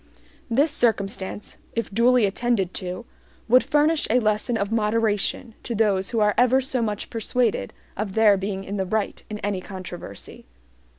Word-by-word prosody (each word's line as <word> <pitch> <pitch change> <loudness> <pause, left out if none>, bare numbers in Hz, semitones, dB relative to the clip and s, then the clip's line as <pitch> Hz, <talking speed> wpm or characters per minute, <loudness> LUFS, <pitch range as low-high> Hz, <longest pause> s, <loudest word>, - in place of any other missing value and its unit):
This 280 +6 +2
circumstance, 205 -6 -1 0.2
if 230 -3 -3
duly 240 +1 +4
attended 200 -2 0
to, 185 +5 -5 0.4
would 250 +3 +5
furnish 300 +1 +2
a 245 +3 +4
lesson 215 +1 0
of 200 0 -2
moderation 220 +1 0
to 235 - -4
those 200 -3 +1
who 230 - -1
are 210 -1 +3
ever 250 +1 +5
so 260 -1 -2
much 210 -2 -3
persuaded 225 - 0 0.2
of 200 -1 -3
their 220 -2 +6
being 195 0 -3
in 200 +1 -5
the 190 - -1
right 215 +1 -2
in 210 - -4
any 200 -2 -1
controversy. 180 - -9
215 Hz, 160 wpm, -24 LUFS, 195-240 Hz, 0.4 s, their